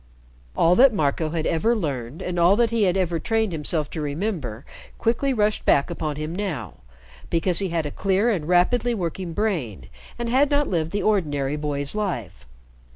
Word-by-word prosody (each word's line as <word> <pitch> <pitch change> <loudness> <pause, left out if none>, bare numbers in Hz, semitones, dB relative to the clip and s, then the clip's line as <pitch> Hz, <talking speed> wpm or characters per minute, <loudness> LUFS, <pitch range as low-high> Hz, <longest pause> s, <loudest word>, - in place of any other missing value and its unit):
All 170 - +5
that 260 -3 +6
Marco 155 -1 0
had 160 0 -2
ever 220 +9 +2
learned 140 - -4
and 175 -1 -2
all 175 +3 +5
that 230 0 +2
he 225 -3 +2
had 185 0 +2
ever 175 -3 0
trained 220 0 0
himself 155 -1 -1
to 160 - -4
remember, 145 - -3 0.3
quickly 240 +4 +1
rushed 215 -4 +1
back 140 +4 +3
upon 155 -3 -3
him 155 +2 -4
now, 195 -6 -4 0.5
because 170 +1 +1
he 195 -2 0
had 165 -2 -1
a 145 - -4
clear 195 +7 +1
and 165 -8 -2
rapidly 230 +7 +2
working 175 -2 -4
brain, 150 - -2 0.3
and 235 - -3
had 265 +4 +3
not 290 0 +2
lived 165 - -1
the 205 +3 -2
ordinary 150 -9 0
boy's 145 -2 -3
life. 190 - -4
175 Hz, 180 wpm, -23 LUFS, 150-215 Hz, 0.5 s, that